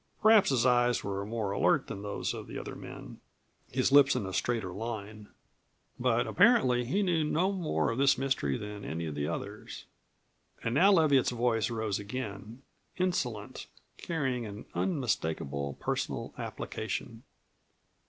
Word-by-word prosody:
Perhaps 215 -2 +6
his 130 -3 +2
eyes 120 -1 +3
were 100 0 -3
more 110 -3 -2
alert - - +2
than 100 - -6
those 100 0 -3
of - - -7
the - - -7
other - - -6
men, - - -10 0.5
his 130 +1 +1
lips 140 -1 +7
in 120 -6 -1
a 95 - -5
straighter 110 -3 -1
line. 105 0 -6 0.7
But - - +2
apparently 125 -1 +4
he 195 +12 +1
knew 170 -4 +2
no 170 +5 +1
more 155 - 0
of 115 - -3
this 140 -1 +4
mystery 130 - 0
than 105 -1 -7
any 85 -2 -4
of 80 - -4
the 70 0 -2
others. 100 +5 -6 0.8
And 115 - -1
now 190 +9 +6
Leviatt's 155 -8 +4
voice 115 -2 +1
rose 110 -4 -2
again, 110 +2 -6 0.3
insolent, 125 - -2 0.3
carrying 135 -7 -2
an 105 0 -8
unmistakable 80 - -2
personal - - -3
application. - - -5
120 Hz, 145 wpm, -30 LUFS, 100-135 Hz, 0.8 s, lips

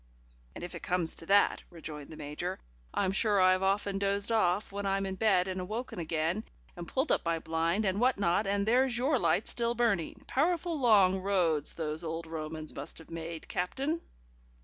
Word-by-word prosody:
"And - - -7
if 175 - -6
it - - -7
comes 175 -2 +1
to 165 - -7
that," 200 +1 +4
rejoined 155 -4 -8
the 155 - -10
Major, 155 +5 -4 0.3
"I'm 190 -2 0
sure 205 0 +2
I've 185 0 +5
often 195 0 0
dozed 200 +2 0
off 205 -2 +2
when 200 0 -4
I'm 195 0 0
in 190 - -3
bed 190 -2 +2
and 185 0 -4
woken 230 -2 -4
again, 165 +5 -1 0.3
and 175 -1 -7
pulled 265 - 0
up - - +2
my 165 -1 0
blind, 165 +5 0
and 190 +1 0
what 255 +1 +3
not, 195 +1 +1
and 200 0 +1
there's 250 +1 +3
your 265 +2 +2
light 215 - +1
still 235 0 -1
burning. 220 -8 0
Powerful 335 +2 0
long 200 -7 +5
roads 180 -6 +1
those 155 0 -3
old 165 0 -4
Romans 155 -1 -6
must 140 +4 -4
have 165 - -11
made, 165 0 -6
Captain." 275 - -2
190 Hz, 190 wpm, -31 LUFS, 165-215 Hz, 0.3 s, I've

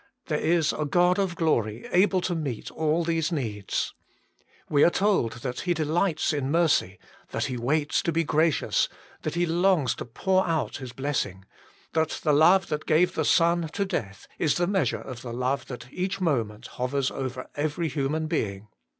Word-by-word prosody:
There 150 -2 -1
is 165 -1 +2
a 155 - -2
God 180 +5 +3
of 190 -3 0
glory 115 -9 0
able 185 0 +3
to 175 - -1
meet 145 -9 -4
all 160 +2 +1
these 165 0 0
needs. 110 - -2 0.7
We 145 -1 +4
are - - +7
told 190 - +1
that 125 -2 -3
He 175 -1 0
delights 160 +2 +1
in 140 -2 -1
mercy, 145 - +2 0.3
that - - -2
He 130 - -3
waits 145 +5 +1
to 170 - 0
be 165 +1 +1
gracious, 155 0 +2 0.3
that - - -3
He 175 0 +2
longs 170 -6 +2
to - - -5
pour 185 - +1
out 160 -3 -1
His 130 -3 -7
blessing; 125 -9 -3 0.5
that 160 -1 0
the 150 - +3
love 175 +5 +5
that 150 0 -3
gave 165 +4 +3
the 160 - 0
Son 170 +1 +3
to 200 - 0
death 100 - -4
is 155 - +2
the 175 - +1
measure 180 - 0
of 125 -2 -8
the 120 -2 -6
love 130 +2 -1
that 125 0 -9
each 185 +2 -2
moment 120 - -1
hovers 130 +2 -2
over 130 -1 -5
every 155 +3 -1
human 155 +1 -1
being. 105 - -2
155 Hz, 180 wpm, -26 LUFS, 130-170 Hz, 0.7 s, are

